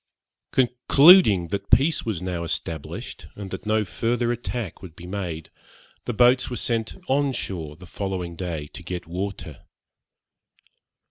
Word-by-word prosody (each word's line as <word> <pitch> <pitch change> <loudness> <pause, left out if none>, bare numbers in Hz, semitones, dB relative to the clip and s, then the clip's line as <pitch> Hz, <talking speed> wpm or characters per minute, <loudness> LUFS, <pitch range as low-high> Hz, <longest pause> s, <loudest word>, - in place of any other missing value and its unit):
Concluding 125 - +6
that 100 +1 -4
peace 155 +3 +4
was 105 -7 -3
now 90 -2 -3
established, 80 -2 -5
and 100 -2 -8
that - - -6
no 110 0 +2
further 120 +4 0
attack 120 -5 -4
would 90 -5 -11
be 85 - -11
made, 90 -4 -5 0.5
the - - -1
boats 125 +3 +4
were 125 - -4
sent 115 -2 -2
on 140 +1 +2
shore 80 -10 -4
the 90 - -13
following 90 -3 -4
day 85 -4 -4
to 80 - -10
get 90 0 -5
water. 95 +4 -5
100 Hz, 140 wpm, -24 LUFS, 90-120 Hz, 0.5 s, Concluding